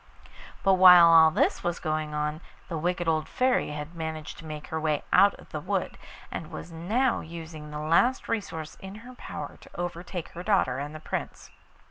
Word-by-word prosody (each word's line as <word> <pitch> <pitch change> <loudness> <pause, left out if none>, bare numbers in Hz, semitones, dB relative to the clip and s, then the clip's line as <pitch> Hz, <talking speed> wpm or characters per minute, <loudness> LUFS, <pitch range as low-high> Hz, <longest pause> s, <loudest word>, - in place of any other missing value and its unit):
But 195 - +5
while 180 -2 +10
all 165 -1 +8
this 155 - +1
was 175 0 -1
going 155 -1 -2
on 150 +1 -2 0.3
the 165 - -3
wicked 175 +1 -1
old 155 -1 0
Fairy 255 0 +1
had 150 +2 -6
managed 160 -2 -6
to 160 - -11
make 150 -1 -7
her 160 - -2
way 155 -2 0
out 200 0 +6
of - - -17
the - - -4
wood, - - -2 0.4
and - - -6
was - - -8
now 220 +11 0
using 160 -2 -9
the 150 - -6
last 170 +12 +2
resource 165 -8 -4
in 190 +1 -9
her 255 - -10
power - - -8
to - - -15
overtake 175 0 -5
her 175 - -8
daughter 180 -10 +1
and 145 +2 -6
the - - -7
Prince. - - -6
165 Hz, 190 wpm, -27 LUFS, 155-180 Hz, 0.4 s, while